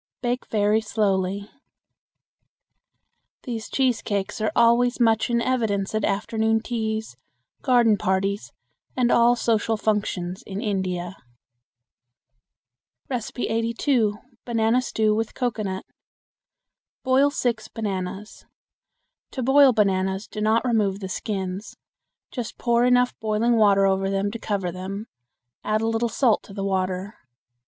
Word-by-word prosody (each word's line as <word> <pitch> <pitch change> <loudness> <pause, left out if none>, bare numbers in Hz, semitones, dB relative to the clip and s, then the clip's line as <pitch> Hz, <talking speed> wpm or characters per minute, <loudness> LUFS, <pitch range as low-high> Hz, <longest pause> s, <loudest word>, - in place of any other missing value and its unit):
Bake 245 +1 -1
very 210 0 +2
slowly. 200 -2 -1 2.0
These 230 -4 -5
cheese 255 -4 +1
cakes 200 0 -3
are 215 - +1
always 235 +2 +4
much 225 -1 +3
in 235 0 +2
evidence 220 -6 0
at 215 -1 -1
afternoon 220 +2 +1
teas, 220 - -3 0.4
garden 240 -5 +4
parties, 195 +2 -1 0.5
and 245 -1 +2
all 235 +1 +5
social 225 -1 0
functions 200 -4 -1
in 195 0 -5
India. 190 -4 -2 1.9
82. 230 -1 0 0.3
Banana 230 +1 +1
Stew 220 -3 +1
with 225 +1 -2
Cocoanut. 215 -6 -2 1.2
Boil 265 +2 +4
six 245 -5 -2
bananas. 195 -1 -5 0.8
To 260 - -4
boil 270 +1 +6
bananas 190 -2 +1
do 210 - -6
not 220 +3 +2
remove 210 -5 +1
the 190 -2 -6
skins. 190 0 -4 0.5
Just 245 -4 -5
pour 235 0 +2
enough 250 0 +3
boiling 220 +2 +1
water 200 -3 +4
over 195 0 +1
them 195 +1 -1
to 230 - -6
cover 195 -5 -2
them. 190 +4 -6 0.6
Add 215 +1 0
a 225 - 0
little 225 +1 0
salt 235 -2 +2
to 195 - -12
the 195 -1 -3
water. 190 +1 -2
220 Hz, 120 wpm, -24 LUFS, 195-235 Hz, 2.0 s, boil